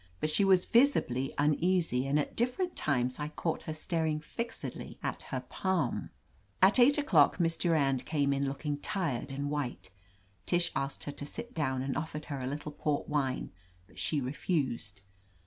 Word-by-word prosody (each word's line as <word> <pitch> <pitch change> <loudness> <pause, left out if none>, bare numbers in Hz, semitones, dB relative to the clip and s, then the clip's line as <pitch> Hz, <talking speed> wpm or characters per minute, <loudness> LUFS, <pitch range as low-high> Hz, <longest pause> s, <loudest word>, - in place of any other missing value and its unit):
But 155 - 0
she 200 - +4
was 190 -2 +5
visibly 230 - +3
uneasy 150 -2 +2
and 140 +2 +2
at 150 - -1
different 255 +10 0
times 125 -3 +1
I 150 - -2
caught 155 +2 -2
her 155 - -5
staring 160 -2 0
fixedly 230 +9 -6
at - - -2
her - - -2
palm. 185 -10 -1 0.5
At 195 +6 +6
eight 275 +4 +6
o'clock 185 - +4
Miss 165 -1 +2
Durand 140 -7 +2
came 145 -3 +1
in 140 0 0
look 140 +3 -5
ing 145 -1 0
tired 145 - -2
and 140 +1 -3
white, 140 -9 -3 0.6
Tish 175 -1 +3
asked 135 +1 -2
her 145 - -4
to 145 - -7
sit 235 +10 -5
down 130 -5 -1
and 135 0 -2
offered 155 -1 -4
her 140 -3 -4
a 125 - -3
little 145 +2 -4
port 150 0 -1
wine, 135 -3 -1 0.3
but - - -14
she 155 - +1
refused. 125 - -2
150 Hz, 175 wpm, -31 LUFS, 135-175 Hz, 0.6 s, At